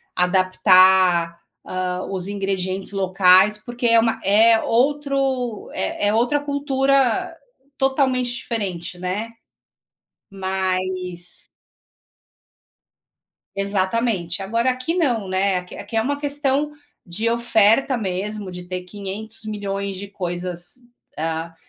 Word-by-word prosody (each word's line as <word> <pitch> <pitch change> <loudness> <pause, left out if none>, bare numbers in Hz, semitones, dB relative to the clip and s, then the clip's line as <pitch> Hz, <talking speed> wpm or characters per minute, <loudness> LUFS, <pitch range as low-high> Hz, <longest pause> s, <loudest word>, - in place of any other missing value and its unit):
adaptar, 185 -2 +4 0.3
hã, 185 0 -3
os 185 -1 -3
ingredientes 195 -1 -3
locais, 190 +1 +5
porque 240 +2 -6
é 230 0 +6
uma 225 0 +1
é 220 +3 +5
outro 270 -2 0
é 205 - -1
é 205 - +2
outra 240 +6 +2
cultura 275 -3 +1 0.4
totalmente 265 -2 +1
diferente, 185 -8 -4
né. 190 +5 -3 1.0
Mas 185 -2 -3 2.1
Exatamente. 195 -2 -1
Agora, 230 +6 0
aqui 255 +6 -3
não, 245 - 0
né. 190 0 +1
Aqui 180 0 -7
aqui 205 +3 -8
é - - +4
uma 285 +5 -2
questão 290 0 0 0.3
de 210 +6 -2
oferta 235 +2 +3
mesmo, 200 0 -4
de 180 0 -8
ter 180 0 -4
500.000.000 200 0 -5
de 200 +2 -7
coisas, 175 -2 -3 0.4
ah, 165 +1 -3
200 Hz, 100 wpm, -21 LUFS, 185-240 Hz, 2.1 s, é